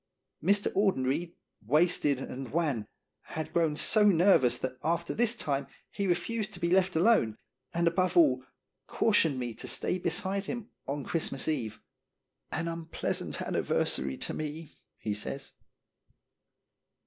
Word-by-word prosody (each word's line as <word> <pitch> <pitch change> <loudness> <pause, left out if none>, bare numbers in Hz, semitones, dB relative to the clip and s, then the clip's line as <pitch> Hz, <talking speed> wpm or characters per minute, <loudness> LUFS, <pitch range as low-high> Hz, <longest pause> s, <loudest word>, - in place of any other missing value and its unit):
Mr. 200 +4 +3
Audenried, 170 -4 +1 0.3
wasted 150 +2 +3
and 130 -1 -6
wan, 145 -10 0 0.4
had 155 0 -5
grown 165 -3 +2
so 215 +7 +4
nervous 175 -10 +5
that 130 0 -4
after 170 +2 0
this 235 +1 +2
time 140 -10 -2 0.2
he 200 -1 -2
refused 205 +5 -1
to - - -10
be 170 0 0
left 185 -1 +3
alone, 160 - +3 0.3
and 170 0 +1
above 185 - +1
all, 330 -3 +5 0.4
cautioned 165 -10 +2
me 120 -2 -3
to - - -9
stay 185 - -1
beside 190 +3 -1
him 235 +2 -5 0.2
on 140 +1 -3
Christmas 145 -4 -1
Eve. 115 -9 -2 0.7
"An 165 +2 -2
unpleasant 165 -1 -2
anniversary 65 0 0
to - - -3
me," 155 +1 -5 0.3
he 105 - -3
says. 120 +6 -5
165 Hz, 135 wpm, -30 LUFS, 135-190 Hz, 0.7 s, nervous